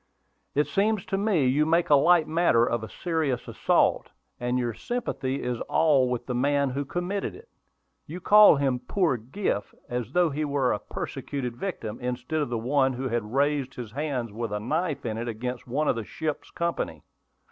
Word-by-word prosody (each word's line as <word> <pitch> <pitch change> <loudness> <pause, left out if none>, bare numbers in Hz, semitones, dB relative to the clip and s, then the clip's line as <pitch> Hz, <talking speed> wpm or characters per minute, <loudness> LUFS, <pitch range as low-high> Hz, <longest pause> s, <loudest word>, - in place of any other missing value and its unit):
"It 150 +1 +3
seems 210 -1 0
to - - -2
me 195 -7 +2
you 135 +4 +3
make 165 +1 +2
a - - +9
light 165 +3 +5
matter 160 -8 +3
of 120 -2 -1
a 110 - -6
serious 160 -7 -2
assault, - - +2 0.3
and 125 +1 0
your 120 -2 -1
sympathy 140 - -3
is 125 -1 -2
all 140 -6 +4
with 125 -1 -2
the 125 - -3
man 140 +2 +1
who 140 +2 -2
committed 180 +6 -3
it. 455 +3 -14 0.6
You 170 +4 -6
call 210 0 +7
him 135 -3 0
'poor 160 +3 +1
Griff,' 120 - -3
as 120 -3 -3
though 175 -3 +3
he 150 +2 -2
were 140 -3 +1
a 105 - -2
persecuted 125 -4 -5
victim, 120 - -5
instead 125 +5 -2
of 145 - -2
one 130 +3 +1
who 130 +1 -3
had 115 -2 -2
raised 140 -1 +1
his 120 -4 -7
hand 130 -4 -3
with 115 -1 -3
a 105 - -1
knife 150 - -2
in 110 -1 -2
it 120 - -4
against 125 +3 -4
one 145 +5 0
of - - +3
the 115 - -3
ship's 155 +6 -4
company." 170 - -3
135 Hz, 190 wpm, -26 LUFS, 120-160 Hz, 0.6 s, a